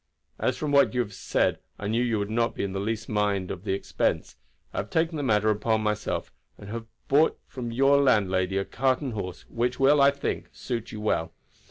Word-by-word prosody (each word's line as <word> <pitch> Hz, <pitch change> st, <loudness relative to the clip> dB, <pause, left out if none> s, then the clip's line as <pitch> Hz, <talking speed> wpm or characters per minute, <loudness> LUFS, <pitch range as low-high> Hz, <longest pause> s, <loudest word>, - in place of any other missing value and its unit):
As -, -, 0 dB
from 150 Hz, -2 st, -2 dB
what 140 Hz, -2 st, +4 dB
you 125 Hz, -, +3 dB
have 105 Hz, -4 st, -5 dB
said -, -, 0 dB, 0.2 s
I -, -, -6 dB
knew 110 Hz, +3 st, +1 dB
that 125 Hz, -, +1 dB
you 115 Hz, -, +1 dB
would 100 Hz, +1 st, -2 dB
not 115 Hz, +1 st, 0 dB
in 100 Hz, -1 st, -1 dB
the 95 Hz, -, -2 dB
least 110 Hz, +2 st, -2 dB
mind 100 Hz, -3 st, 0 dB
the 95 Hz, +1 st, -3 dB
expense, 100 Hz, -, -1 dB, 0.4 s
I -, -, -7 dB
have -, -, -2 dB
taken 165 Hz, 0 st, +1 dB
the 150 Hz, -, -2 dB
matter 110 Hz, -5 st, +3 dB
upon 110 Hz, +1 st, +1 dB
myself, 105 Hz, 0 st, -2 dB, 0.3 s
and 100 Hz, -, -11 dB
have 115 Hz, 0 st, -5 dB, 0.2 s
bought 150 Hz, +4 st, +4 dB
from 125 Hz, -3 st, -6 dB
your 135 Hz, +4 st, +4 dB
landlady 95 Hz, -7 st, +2 dB
a 95 Hz, -, 0 dB
cart 130 Hz, +2 st, +1 dB
and 135 Hz, -5 st, -3 dB
horse, 90 Hz, -4 st, -5 dB
which 120 Hz, +2 st, -1 dB
will, 140 Hz, +2 st, +5 dB
I 140 Hz, -, +7 dB
think, 140 Hz, 0 st, -3 dB
suit 115 Hz, -3 st, -4 dB
you 110 Hz, -, -6 dB
well. 80 Hz, -6 st, 0 dB
115 Hz, 215 wpm, -27 LUFS, 100-130 Hz, 0.4 s, I